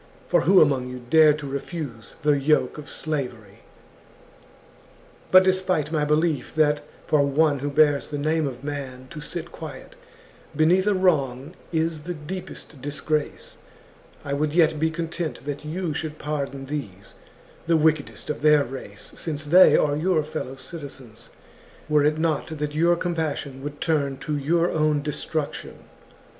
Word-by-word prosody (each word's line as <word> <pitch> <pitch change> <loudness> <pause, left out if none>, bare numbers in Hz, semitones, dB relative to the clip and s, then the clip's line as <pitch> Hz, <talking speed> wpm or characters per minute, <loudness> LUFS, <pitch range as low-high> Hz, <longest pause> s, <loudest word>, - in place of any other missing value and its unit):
For - - +3
who 190 +3 +6
among 135 -4 +2
you 125 -1 -8
dared 155 -2 +6
to 145 -2 -7
refuse 140 -4 -6
the 150 -1 +4
yoke 150 +2 +1
of 145 - -10
slavery? 125 -10 -5 0.9
" - - -27
But, 185 0 +8
despite 185 -5 +1
my 150 -2 +1
belief 150 -2 0
that 150 -1 +3 0.2
for 150 - +3
one 145 +1 +2
who 145 +2 -2
bears 145 -1 +3
the 145 - -4
name 155 +1 +1
of 130 0 -7
man 135 -3 -5
to 150 - -7
sit 170 +2 -4
quiet 150 -5 -9 0.6
beneath 175 +6 +3
a 205 - +3
wrong 145 -6 +1 0.2
is 160 -1 0
the 175 +3 -5
deep 175 +5 -6
est 145 -5 -11
disgrace, 150 +2 -3 0.7
I 140 - -2
would 150 +2 -1
yet 160 -3 +4
be 160 +1 +2
content 165 -3 -4
that 145 +1 -5
you 165 +1 -3
should 155 +1 -4
pardon 140 -3 -4
these, 130 -10 -6 0.5
the 165 -1 +4
wickedest 155 -1 0
of 150 - -6
their 150 -1 +5
race, 130 +1 -8
since 155 -2 -4
they 180 +5 +7
are 145 -1 +2
your 160 0 +1
fellow 150 -3 -5
citizens, 135 -6 -10 0.6
were 150 -1 +3
it 150 +1 +2
not 160 -2 0
that 150 0 -3
your 170 +3 +3
com 175 0 -2
passion 145 -4 -3
would 145 +1 -6
turn 140 -4 0
to 150 - -3
your 165 +4 +1
own 155 -2 +1
destruction. 150 0 -4
150 Hz, 160 wpm, -24 LUFS, 140-160 Hz, 0.9 s, But